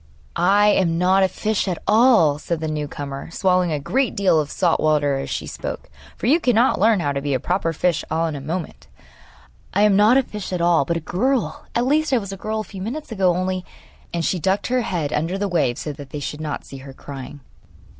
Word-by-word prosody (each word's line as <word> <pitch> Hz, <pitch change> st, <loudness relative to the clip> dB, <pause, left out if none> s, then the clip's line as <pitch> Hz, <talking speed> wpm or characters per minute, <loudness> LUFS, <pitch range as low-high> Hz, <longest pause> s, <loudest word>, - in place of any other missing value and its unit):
'I 200 Hz, +4 st, +4 dB
am 175 Hz, -5 st, +2 dB
not 185 Hz, +2 st, +3 dB
a 190 Hz, -, +5 dB
fish 210 Hz, +3 st, -2 dB
at 180 Hz, -3 st, -1 dB
all,' 215 Hz, -, +5 dB
said 170 Hz, +1 st, -3 dB
the 160 Hz, -, -3 dB
new 150 Hz, -1 st, -3 dB
comer, 140 Hz, 0 st, -7 dB
swallowing 180 Hz, 0 st, +1 dB
a 150 Hz, -, -1 dB
great 255 Hz, -, 0 dB
deal 190 Hz, -5 st, +3 dB
of 150 Hz, -1 st, -2 dB
salt 175 Hz, -3 st, +1 dB
water 145 Hz, -3 st, +2 dB
as 135 Hz, -, -5 dB
she -, -, -3 dB
spoke; -, -, -6 dB, 0.3 s
for -, -, -5 dB
you 295 Hz, +8 st, +4 dB
cannot 245 Hz, -3 st, +2 dB
learn 215 Hz, -1 st, +4 dB
how 145 Hz, -, 0 dB
to 140 Hz, 0 st, -2 dB
be 140 Hz, -1 st, -1 dB
a -, -, 0 dB
proper 175 Hz, +3 st, -1 dB
fish 170 Hz, +1 st, 0 dB
all 160 Hz, +1 st, 0 dB
in 160 Hz, -2 st, -3 dB
a 140 Hz, -, -6 dB
moment. 165 Hz, +4 st, -5 dB, 0.9 s
'I 200 Hz, -, +3 dB
am 210 Hz, -2 st, +5 dB
not 215 Hz, +5 st, +5 dB
a 270 Hz, -, +3 dB
fish 210 Hz, -5 st, -7 dB
at 180 Hz, -, -2 dB
all, 170 Hz, -4 st, +3 dB
but 170 Hz, +4 st, -1 dB
a -, -, -5 dB
girl; 245 Hz, -, -1 dB
at 240 Hz, -, +2 dB
least 300 Hz, +2 st, +1 dB
I -, -, +5 dB
was 200 Hz, -3 st, -4 dB
a -, -, -4 dB
girl 215 Hz, +2 st, -3 dB
a -, -, -5 dB
few 195 Hz, -3 st, -10 dB
minutes 245 Hz, +8 st, -5 dB
ago, 190 Hz, -5 st, +2 dB
only 185 Hz, 0 st, -2 dB, 0.3 s
' -, -, -29 dB
And 170 Hz, -1 st, -2 dB
she 185 Hz, -, 0 dB
ducked 190 Hz, +5 st, 0 dB
her 255 Hz, -, +3 dB
head 165 Hz, -9 st, -2 dB
under 165 Hz, +5 st, -1 dB
the 205 Hz, +1 st, -1 dB
waves 160 Hz, -10 st, 0 dB
so 150 Hz, -, -4 dB
that 140 Hz, -1 st, -11 dB
they 150 Hz, -, -5 dB
should 150 Hz, +1 st, -5 dB
not 150 Hz, -2 st, -4 dB
see 135 Hz, -, -10 dB
her 135 Hz, 0 st, -11 dB
crying. 140 Hz, +1 st, -9 dB
180 Hz, 245 wpm, -21 LUFS, 150-210 Hz, 0.9 s, a